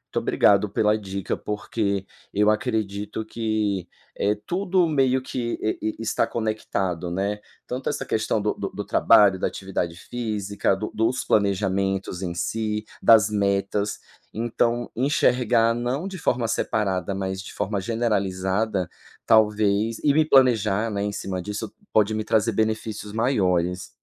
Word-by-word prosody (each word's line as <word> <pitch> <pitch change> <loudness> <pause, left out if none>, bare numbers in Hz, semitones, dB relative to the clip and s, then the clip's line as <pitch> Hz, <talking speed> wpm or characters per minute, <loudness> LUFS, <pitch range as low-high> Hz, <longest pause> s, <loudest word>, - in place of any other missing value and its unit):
Muito - - +3
obrigado 100 0 +3
pela 105 +2 +2
dica 95 -2 -4
porque 100 -1 -2 0.3
eu 105 +1 +3
acredito 105 -2 -2
que 110 -5 -1 0.3
é 105 +1 +1
tudo 180 - 0
meio 130 -4 +2
que 120 -2 -3
e 110 0 -2
e - - -6
está 115 - +1
conectado, 95 -6 -2
né, 100 +3 -1 0.3
tanto 130 +1 -3
essa - - -3
questão 110 0 0
do 105 +1 0
do - - -4
do - - -6
trabalho, 100 -3 +5
da - - +1
atividade 90 -3 -3
física, 105 -3 -2
do 105 +3 -4
dos 115 +3 0
planejamentos 95 -2 0
em 90 -2 -3
si, 105 +4 -2 0.2
das 110 -2 +6
metas, 100 0 0 0.3
então 120 +1 0
enxergar 120 -3 +3
não 125 +8 -2
de 195 -1 -6
forma 120 -7 0
separada 100 -4 -1
mas 95 0 -3
de 95 - -10
forma 100 -1 -2
generalizada, 100 -3 -1 0.4
talvez, 110 0 +3
e 145 - +4
me 155 +2 +4
planejar, 115 -6 +3
né, 100 -1 -2
em 105 - -1
cima 95 -2 -4
disso, 105 +3 -5 0.2
pode 110 0 +3
me 110 0 -1
trazer 110 +1 +2
benefícios 110 -1 -2
maiores. 90 -7 +1
105 Hz, 140 wpm, -24 LUFS, 100-115 Hz, 0.4 s, das